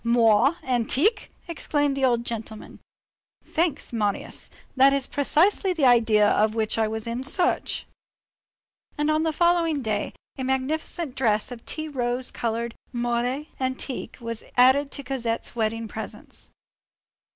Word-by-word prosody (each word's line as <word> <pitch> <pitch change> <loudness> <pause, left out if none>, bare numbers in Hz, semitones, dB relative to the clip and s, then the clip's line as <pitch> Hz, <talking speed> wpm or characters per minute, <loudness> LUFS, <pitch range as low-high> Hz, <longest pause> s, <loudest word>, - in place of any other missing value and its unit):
"Moire 235 +4 +4
antique!" 265 - +1 0.2
exclaimed 290 -4 0
the 275 - -2
old 240 -2 +2
gentleman. 220 -2 -6 0.6
"Thanks, 325 -6 -1
Marius. 210 -3 -2 0.3
That 270 +1 +6
is 275 -2 +1
precisely 345 +8 +2
the 315 -6 +1
idea 225 -4 +5
of 215 +1 +2
which 220 0 0
I 220 - +3
was 220 0 -4
in 235 +2 -3
search." 350 +6 0 1.1
And 295 +1 +1
on 310 0 +2
the 320 0 +1
following 335 -3 +2
day, 215 -2 -2 0.3
a - - -2
magnificent 265 +3 -2
dress 225 -3 +1
of 235 -2 -8
tea 310 0 -4
rose 250 -3 -2
colored 230 0 -2 0.2
moire 240 +3 -1
antique 260 0 -4
was 230 -2 -5
added 260 +3 +5
to 280 - -6
Cosette's 240 -4 -3
wedding 225 0 -1
presents. 220 +1 -8
250 Hz, 135 wpm, -25 LUFS, 230-290 Hz, 1.1 s, That